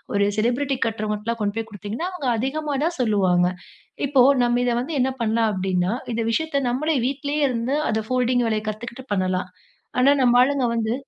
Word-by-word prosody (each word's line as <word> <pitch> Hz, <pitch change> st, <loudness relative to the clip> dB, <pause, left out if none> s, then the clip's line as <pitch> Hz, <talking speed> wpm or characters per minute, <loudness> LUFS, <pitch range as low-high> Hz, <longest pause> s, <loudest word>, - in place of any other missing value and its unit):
ஒரு 200 Hz, -, +3 dB
செலிப்ரிட்டி 255 Hz, +4 st, 0 dB
கட்டுறவங்கிட்லாம் 215 Hz, +1 st, -3 dB
கொண்டு 205 Hz, 0 st, -1 dB
போய் 225 Hz, 0 st, -3 dB
குடுத்தீங்கன்னா, 210 Hz, -, -4 dB
அவுங்க 290 Hz, -8 st, -3 dB
அதிகமா 285 Hz, +4 st, -2 dB
தான் 340 Hz, +1 st, -2 dB
சொல்லுவாங்க. 190 Hz, -6 st, +3 dB, 0.6 s
இப்போ 275 Hz, -1 st, +2 dB, 0.2 s
நம்ப 240 Hz, 0 st, +2 dB
இத 245 Hz, -, +2 dB
வந்து 310 Hz, +5 st, -5 dB
என்ன 260 Hz, -, +2 dB
பண்ணலாம்? 225 Hz, 0 st, +2 dB
அப்பிடின்னா, 185 Hz, +1 st, 0 dB, 0.2 s
இந்த 230 Hz, -, -1 dB
விஷயத்த 285 Hz, 0 st, 0 dB
நம்பளே 300 Hz, +5 st, 0 dB
வீட்லேயே 285 Hz, +2 st, -2 dB
இருந்து 245 Hz, +3 st, -1 dB
அத 220 Hz, -1 st, 0 dB
ஃபோல்டிங் 250 Hz, -1 st, +1 dB
வேலைய 215 Hz, -1 st, -1 dB
கத்துக்கிட்டு 235 Hz, +4 st, -7 dB
பண்ணலாம். 185 Hz, -1 st, -1 dB, 0.5 s
ஆனா 275 Hz, +3 st, +5 dB
நம்ப 245 Hz, -1 st, +4 dB
ஆளுங்க 270 Hz, 0 st, +2 dB
வந்து, 225 Hz, 0 st, 0 dB
235 Hz, 170 wpm, -23 LUFS, 215-270 Hz, 0.6 s, ஆனா